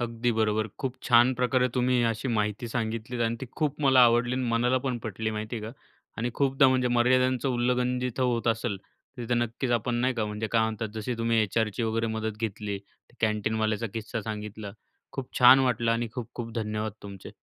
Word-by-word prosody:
अगदी 120 0 -1
बरोबर. 110 0 +1
खूप 130 -2 -3
छान 120 +1 +5
प्रकारे 125 +1 +2
तुम्ही 125 0 +2
अशी 115 +4 -4
माहिती 105 +3 -1
सांगितली. 115 +1 -3
आणि 115 +1 0
ती 130 - -5
खूप 150 -1 -1
मला 135 -2 +6
आवडली 120 +1 +3
आणि 130 0 -1
मनाला 120 +2 +2
पण 125 -2 -1
पटली 110 +1 -3
माहिती 110 +2 -4
आहे 110 - -6
का. 115 - -7 0.4
आणि 120 +2 -2
खूपदा, 135 -1 +4
म्हणजे 130 -1 +2
मर्यादांचं 130 +2 +2
उल्लंघन 125 0 +1
जिथं 125 +1 -2
होत 120 -2 0
असेल, 115 -2 0 0.4
तिथं 120 0 -1
नक्कीच 120 +2 -2
आपण 120 +1 0
नाही 125 +2 +1
का, 115 -3 -1
म्हणजे 105 +1 -3
काय 115 -1 +4
म्हणतात, 110 0 -2
जशी 110 +3 -3
तुम्ही 115 0 +1
एचआरची 110 +2 -1
वगैरे 115 0 0
मदत 110 -1 -3
घेतली, 105 -2 -3 0.4
कॅन्टीनवाल्याचा 110 0 0
किस्सा 115 +1 -4
सांगितला. 105 -1 -6 0.4
खूप 135 -2 -6
छान 125 +1 +9
वाटलं 120 -3 +1
आणि 115 0 -1
खूप-खूप 120 -1 -6
धन्यवाद 110 -1 -2
तुमचे. 100 -2 -9
115 Hz, 180 wpm, -27 LUFS, 110-125 Hz, 0.4 s, छान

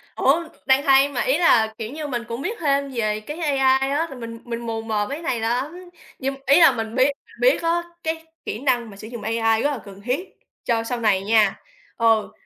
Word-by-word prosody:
Ủa, 310 +6 +3 0.2
đang 265 +1 +4
hay 275 0 +5
mà, 275 - -2
ý 265 +4 +2
là, 220 -10 +4
kiểu 225 +2 -5
như, 300 0 -5
mình 240 -3 -3
cũng 235 +3 -5
biết 445 +8 -3
thêm 280 -3 +1
về 215 -2 -1
cái 295 +9 -8
AI 270 -3 +2
á, 320 +4 0
là 270 - -9
mình 230 -1 -8
mình 235 -1 -4
mù 225 -1 -3
mờ 215 -2 -1
mấy 280 - -3
cái - - -10
này 250 -8 -1
lắm, 280 +11 -3 0.3
nhưng 270 +1 -2
ý 280 +6 +6
là 325 - +8
mình 225 -1 -4
biết 260 +2 +4 0.3
biết - - +4
á, 340 +1 +1 0.2
cái 320 0 -3 0.2
kỹ 215 - -4
năng 245 -4 0
mà 200 - -12
sử 215 - -9
dụng 235 -1 -8
AI 225 0 +1
rất 290 - +2
là 265 - -4
cần 200 0 -12
thiết 260 - -2 0.3
cho 230 -2 0
sau 240 +1 -3
này 205 -4 +2
nha. 215 -2 +3 0.4
Ừ, 225 -2 +2
255 Hz, 230 wpm, -22 LUFS, 225-285 Hz, 0.4 s, là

